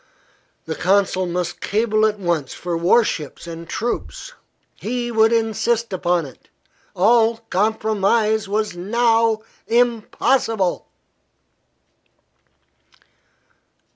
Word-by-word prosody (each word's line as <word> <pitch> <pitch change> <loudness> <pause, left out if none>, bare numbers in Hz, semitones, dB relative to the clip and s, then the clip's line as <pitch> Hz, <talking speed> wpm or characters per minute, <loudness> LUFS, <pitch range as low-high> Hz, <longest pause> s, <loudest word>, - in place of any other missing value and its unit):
The 160 - -3
consul 185 +1 +1
must 175 0 -3
cable 215 0 +1
at 210 -1 -2
once 170 -8 -2
for 175 -1 -4
war 180 +8 +4
ships 155 -8 -5
and 165 0 -8
troops. 240 - -4 0.4
He 240 +1 -4
would 220 0 +4
insist 230 0 0
upon 175 -2 0
it. 130 - -15 0.5
All 225 +4 +4
compromise 215 +1 +1
was 210 -2 -1
now 225 +3 +1 0.2
impossible! 230 -3 +1
215 Hz, 90 wpm, -20 LUFS, 180-230 Hz, 0.5 s, war